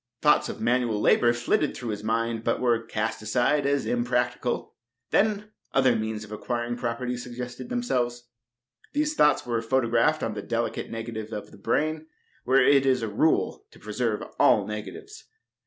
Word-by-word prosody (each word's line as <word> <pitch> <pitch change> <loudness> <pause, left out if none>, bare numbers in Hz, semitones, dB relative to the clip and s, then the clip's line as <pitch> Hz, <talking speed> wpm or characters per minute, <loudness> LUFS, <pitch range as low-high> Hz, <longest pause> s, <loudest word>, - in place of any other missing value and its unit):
Thoughts 150 0 +4
of - - -6
manual 120 -2 +1
labor 120 +2 +4
flitted 120 +5 0
through 120 -3 -5
his 105 0 -5
mind, 115 +1 -1
but 115 - 0
were 120 -2 +2
cast 115 -1 -3
aside 125 +6 +1
as 140 -1 +1
impracticable. 125 0 -1 0.4
Then 210 0 +1 0.2
other 130 -3 +4
means 110 -1 -3
of 105 - -12
acquiring 120 +2 -3
property 125 +1 -2
suggested 125 - -7
themselves. 125 - -1 0.7
These 300 +1 +1
thoughts 150 - +3
were 120 -2 -1
photographed 120 +4 +2
on 110 - -1
the 105 - -5
delicate 115 +2 -2
negative 115 -1 -6
of 105 -2 -6
the - - -14
brain, 155 +8 -1 0.4
where 130 +1 +4
it 140 -1 +5
is 130 -3 +2
a - - -1
rule 105 - +1
to - - -18
preserve 110 0 -2 0.2
all - - +5
negatives. 105 - -8
120 Hz, 160 wpm, -26 LUFS, 115-135 Hz, 0.7 s, it